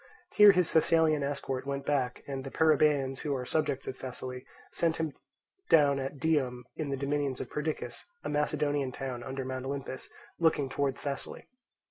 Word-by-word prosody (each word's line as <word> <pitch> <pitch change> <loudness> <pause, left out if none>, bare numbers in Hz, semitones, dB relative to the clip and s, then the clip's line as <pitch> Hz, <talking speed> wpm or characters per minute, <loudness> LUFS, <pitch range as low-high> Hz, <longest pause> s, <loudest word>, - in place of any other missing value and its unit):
Here 210 -1 +9
his 180 -3 +1
Thessalian 160 -2 +4
escort 140 -2 -3
went 140 0 -3
back, 130 -4 0
and 135 -1 -4
the 135 - -6
Perrhaebians, 150 -3 +3
who 145 -2 -1
are 125 -1 -3
subjects 150 -1 0
of - - -4
Thessaly, 125 0 -6 0.2
set 165 -1 +1
him 160 -3 -2 0.6
down 145 -3 +5
at 135 +2 -4
Dium 135 -5 0
in 155 -3 -3
the 135 - -1
dominions 140 -1 -1
of - - -6
Perdiccas, 150 -5 -3 0.2
a - - -3
Macedonian 145 -2 0
town 125 -1 -5
under 135 +1 -4
Mount 130 0 -4
Olympus, 135 -1 -5 0.3
looking 155 -5 +2
towards 135 0 -1
Thessaly. 140 -1 -5
140 Hz, 165 wpm, -30 LUFS, 130-150 Hz, 0.6 s, Here